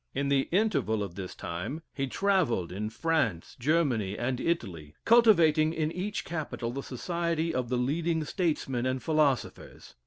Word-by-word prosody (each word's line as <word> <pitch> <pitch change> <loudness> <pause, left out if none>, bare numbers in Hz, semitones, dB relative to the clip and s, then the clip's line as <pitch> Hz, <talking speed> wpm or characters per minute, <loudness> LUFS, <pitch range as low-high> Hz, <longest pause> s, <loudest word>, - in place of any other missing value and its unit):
In 140 0 0
the 135 -1 +2
interval 180 - +1
of 95 -4 -6
this 95 -1 -7
time 105 - -5
he 135 -1 -2
travelled 145 - +1
in 105 +4 -3
France, 115 - -1
Germany, 125 - +1
and 125 +1 -1
Italy; 90 - -3
cultivating 170 -10 +5
in 155 -1 -1
each 195 +4 -3
capital 150 -8 -4
the 135 +3 -4
society 170 +4 -2
of 125 -4 -2
the 125 - 0
leading 160 +6 0
statesmen 145 -7 -1
and 130 0 -2
philosophers. 155 -5 -1
140 Hz, 150 wpm, -29 LUFS, 115-165 Hz, -, cultivating